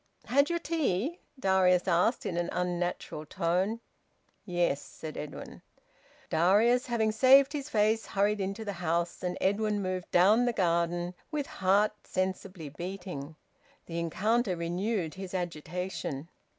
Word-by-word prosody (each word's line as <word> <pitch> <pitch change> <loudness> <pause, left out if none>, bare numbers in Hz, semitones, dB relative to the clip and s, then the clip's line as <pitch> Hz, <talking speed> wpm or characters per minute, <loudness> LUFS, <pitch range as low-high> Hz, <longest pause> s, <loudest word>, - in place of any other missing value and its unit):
"Had 280 +4 +3
your 345 - +1
tea?" 315 - -1 0.2
Darius 185 -3 +3
asked, 180 +8 +2
in 175 - -2
an 175 0 -1
unnatural 175 -3 -2
tone. 185 +7 0 0.7
"Yes," 175 -6 +1
said 155 -1 -9
Edwin. 150 - -7 0.7
Darius, 210 +10 +4
having 225 -3 +1
saved 265 +5 +6
his 290 -1 -4
face, 220 0 +2
hurried 205 +1 +1
into 195 +3 -3
the 200 - -3
house, 170 -1 -1
and 180 0 -2
Edwin 210 +1 +1
moved 185 -2 -3
down 210 +7 +5
the 240 - +1
garden, 175 -2 0 0.2
with 300 -3 -2
heart 200 +1 +2
sensibly 185 -3 -3
beating. 170 -2 -6 0.5
The 170 0 -4
encounter 205 +5 +1
renewed 175 +1 -2
his 190 +1 -7
agitation. 170 -3 -4
185 Hz, 130 wpm, -30 LUFS, 175-215 Hz, 0.7 s, saved